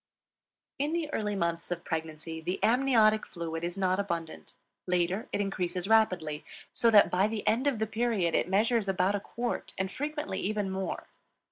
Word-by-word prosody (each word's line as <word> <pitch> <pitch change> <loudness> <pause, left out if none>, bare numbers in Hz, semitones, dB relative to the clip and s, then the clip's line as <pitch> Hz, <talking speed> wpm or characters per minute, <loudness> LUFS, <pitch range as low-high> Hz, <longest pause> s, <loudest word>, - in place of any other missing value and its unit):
In 295 +3 0
the 320 -3 -2
earlier 210 -2 -1
months 170 -1 -1
of 175 -1 -4
pregnancy 160 0 -4
the 180 +4 -2
amniotic 225 -3 +4
fluid 165 -1 -5
is 175 +2 -3
not 185 0 +1
abundant; 170 -5 -4 0.3
later 180 +3 0
it - - -1
increases 185 -2 -2
rapidly, 180 -9 +2 0.3
so 235 - +3
that 210 -2 +6
by 190 +3 +3
the 215 -1 -4
end 250 +6 +2
of 275 -5 +2
the 220 - 0
period 220 -6 0
it 175 - +1
measures 215 +2 +2
about 185 +1 +2
a 205 - 0
quart, 235 +4 -4
and 190 0 -1
frequently 295 -7 -3
even 205 -1 -1
more. 190 -2 -3
195 Hz, 170 wpm, -30 LUFS, 175-220 Hz, 0.3 s, that